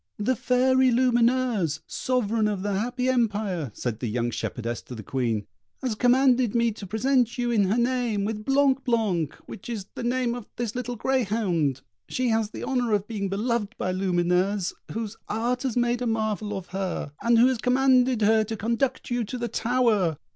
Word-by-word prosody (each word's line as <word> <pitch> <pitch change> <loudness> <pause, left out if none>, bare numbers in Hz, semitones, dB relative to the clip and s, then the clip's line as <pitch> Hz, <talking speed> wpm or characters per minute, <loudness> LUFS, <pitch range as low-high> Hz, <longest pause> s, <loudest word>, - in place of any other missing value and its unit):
"The 235 +5 +1
Fairy 260 +2 +3
Lumineuse, 240 - +2
Sovereign 230 -4 0
of 200 -3 -2
the 205 -1 -1
Happy 245 +5 -1
Empire," 210 - 0
said 115 -3 -3
the 120 - -3
young 120 +2 -1
shepherdess 120 +1 -4
to 125 - -8
the 110 - -8
Queen, 115 -4 -1 0.4
"has 255 -3 0
commanded 250 0 +3
me 235 -1 +3
to 205 -2 -9
present 240 +3 +1
you, 240 -1 0
in 210 -4 +3
her 200 +5 +1
name, 240 -4 0
with 215 0 -3
'Blanc 270 +1 +2
blanc,' 210 - 0
which 190 - -9
is 215 -5 -4
the - - -6
name 245 0 0
of 240 -3 -7
this 235 -3 -3
little 245 -1 -4
greyhound; 205 - 0 0.3
she 255 -1 0
has 220 -1 +1
the - - -8
honour 245 -4 0
of 205 -1 0
being 200 -4 -3
beloved 225 +2 -1
by 185 - -1
Lumineuse, 185 +1 +1 0.2
whose 225 -1 -4
art 240 +4 -1
has 255 -3 -2
made 240 0 +1
a 245 - 0
marvel 215 -2 -1
of 185 -2 -8
her, 190 -6 -3
and 235 0 +4
who 235 - +7
has 255 -2 +2
commanded 255 -1 +3
her 220 +1 +4
to 220 +1 -5
conduct 235 +5 -1
you 240 -1 +1
to 250 - -5
the 240 0 -2
tower. 225 - +1
225 Hz, 185 wpm, -26 LUFS, 200-250 Hz, 0.4 s, who